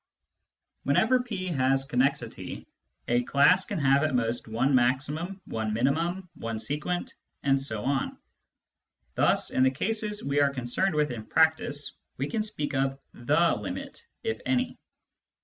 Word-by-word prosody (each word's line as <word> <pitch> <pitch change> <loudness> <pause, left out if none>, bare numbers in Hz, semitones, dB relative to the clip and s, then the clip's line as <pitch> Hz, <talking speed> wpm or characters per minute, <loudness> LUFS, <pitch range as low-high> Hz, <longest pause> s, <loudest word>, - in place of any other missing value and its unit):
Whenever 225 - +3
P 210 -7 -4
has 135 -3 +2
connexity, 135 0 -1 0.4
a 120 0 +3
class 160 +9 +4
can - - -4
have 140 -2 +4
at 155 -4 +1
most 120 -1 0
one 120 +5 +1
maximum, 145 +9 +1
one 110 -1 -2
minimum, 165 - 0
one 115 -1 -4
sequent, 150 +10 -3 0.3
etc. 135 -1 0 1.0
Thus, - - +2
in - - +1
the 130 - +6
cases 210 +8 -2
we 140 +1 +1
are 140 -1 +4
concerned 140 +8 -1
with 150 -2 +2
in 115 -3 -5
practice, 160 -1 +1 0.2
we 140 - -1
can 220 - -1
speak 150 -10 -3
of 135 0 0
" - - -47
the 150 +8 +2
limit - - -6
" - - -53
(if 455 - -2
any). 255 -2 0
140 Hz, 145 wpm, -28 LUFS, 130-175 Hz, 1.0 s, the